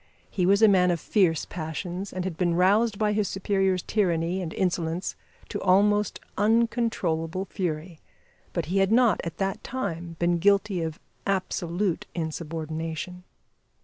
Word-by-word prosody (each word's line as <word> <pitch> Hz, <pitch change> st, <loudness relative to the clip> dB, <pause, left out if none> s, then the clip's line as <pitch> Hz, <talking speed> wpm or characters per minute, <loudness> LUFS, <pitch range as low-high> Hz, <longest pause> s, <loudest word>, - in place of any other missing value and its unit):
He 180 Hz, -3 st, +1 dB
was 200 Hz, +3 st, +4 dB
a -, -, +9 dB
man 185 Hz, -3 st, +4 dB
of 175 Hz, -1 st, +1 dB
fierce 170 Hz, -4 st, +2 dB
passions, 175 Hz, +4 st, -5 dB
and 185 Hz, -, -3 dB
had 185 Hz, -3 st, -3 dB
been 175 Hz, 0 st, +1 dB
roused 205 Hz, +4 st, +3 dB
by 210 Hz, 0 st, +1 dB
his 210 Hz, -1 st, +1 dB
superior's 190 Hz, -1 st, 0 dB
tyranny 180 Hz, -3 st, 0 dB
and 165 Hz, -3 st, -4 dB
insolence 175 Hz, -1 st, -1 dB, 0.3 s
to -, -, -4 dB
almost 205 Hz, +2 st, +3 dB, 0.2 s
uncontrollable 205 Hz, -6 st, +1 dB
fury; 170 Hz, -3 st, -4 dB, 0.5 s
but 170 Hz, -4 st, -2 dB
he 185 Hz, +5 st, 0 dB
had 195 Hz, +1 st, +3 dB
not 235 Hz, -4 st, +4 dB
at 170 Hz, -, -5 dB
that 195 Hz, -1 st, -2 dB
time 175 Hz, -9 st, -4 dB
been 175 Hz, 0 st, +1 dB
guilty 200 Hz, 0 st, +3 dB
of 160 Hz, -1 st, -4 dB, 0.3 s
absolute 185 Hz, -1 st, -1 dB
insubordination. 160 Hz, +2 st, -4 dB
185 Hz, 145 wpm, -26 LUFS, 165-200 Hz, 0.5 s, a